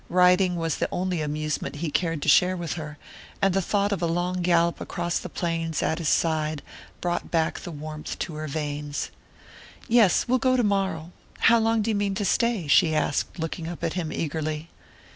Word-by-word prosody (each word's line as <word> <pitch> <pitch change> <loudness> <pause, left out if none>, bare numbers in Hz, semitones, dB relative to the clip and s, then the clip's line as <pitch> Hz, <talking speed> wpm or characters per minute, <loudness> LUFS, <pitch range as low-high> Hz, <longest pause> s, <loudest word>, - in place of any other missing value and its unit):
Riding 180 0 +4
was 165 -3 -1
the - - -1
only 180 -2 -1
amusement 150 0 -2
he 155 +1 -3
cared 165 -2 -1
to - - -4
share 185 +1 +5
with 170 -3 -3
her, 150 -3 -7 0.4
and 195 -2 +2
the 195 - +2
thought 200 +2 0
of 200 - -1
a 170 - +1
long 175 +2 -1
gallop 170 -1 +2
across 175 0 -2
the 180 - -7
plains 165 -2 -2
at 160 - 0
his 165 - 0
side 155 -2 +1 0.4
brought 175 -1 -2
back 160 -2 0
the 180 - -8
warmth 155 -1 -6
to 165 - -4
her 155 0 -5
veins. 145 0 -3 0.8
"Yes, 225 -6 +4
we'll 255 +1 +3
go 255 +1 +3
tomorrow. 195 -7 0 0.3
How 235 +1 +6
long 225 -1 +2
do 225 - 0
you - - 0
mean 200 -1 0
to 205 0 -1
stay?" 235 -6 +1
she 155 +2 +5
asked, 155 +2 0
looking 165 0 -4
up 175 0 -7
at - - 0
him 170 -4 -3
eagerly. 155 0 -3
170 Hz, 195 wpm, -25 LUFS, 155-190 Hz, 0.8 s, How